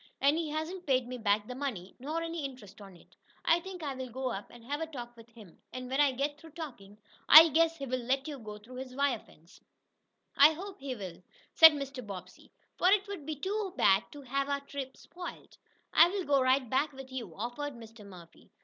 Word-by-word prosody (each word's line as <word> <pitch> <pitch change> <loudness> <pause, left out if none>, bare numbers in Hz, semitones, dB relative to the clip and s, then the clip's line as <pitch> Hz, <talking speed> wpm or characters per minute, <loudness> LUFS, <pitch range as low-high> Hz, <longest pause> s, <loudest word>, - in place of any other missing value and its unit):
And 280 +2 +4
he 325 -1 -2
hasn't 315 +4 -4
paid 255 -3 +2
me 250 0 -6
back 205 -1 +1
the 250 - -7
money, 250 -9 -5
nor 310 +6 -3
any 330 -1 -4
interest 220 -7 -8
on 195 -2 -12
it. 170 - -21 0.3
I 335 - +4
think 365 -1 -9
I'll 260 -3 -4
go 255 +1 -3
up 200 -2 -6
and 240 -1 -15
have 290 +4 -3
a 325 - -2
talk 240 -6 -8
with 230 0 -15
him. 220 -7 -16
And, 255 0 -7
when 270 +2 +3
I 285 -2 +4
get 285 +3 -2
through 320 0 -14
talking, 235 -11 -9 0.3
I 320 +2 +11
guess 330 +2 +2
he'll 275 -4 -6
let 255 +2 -1
you 290 -3 -6
go 210 -2 -8
through 235 +5 -12
his 255 -1 -7
wire 280 -4 +1
fence." 165 -2 -21 0.7
"I 290 +3 +7
hope 380 +4 -8
he 270 -2 -4
will," 185 -5 -8 0.3
said 320 -1 +10
Mr. 275 -3 -5
Bobbsey, 195 -4 -10 0.3
"for 365 - +5
it 400 +1 +3
would 375 -8 -7
be 310 - -2
too 385 +4 -3
bad 195 +3 +4
to 290 -1 -10
have 275 +2 -2
our 280 0 -1
trip 280 -1 -7
spoiled." 355 +1 -10 0.4
"I'll 370 +3 +5
go 280 -2 +3
right 260 0 +3
back 280 +5 0
with 265 0 -10
you," 260 -3 -6
offered 245 +7 -4
Mr. 225 -1 -12
Murphy. 180 -4 -15
270 Hz, 215 wpm, -31 LUFS, 235-310 Hz, 0.7 s, I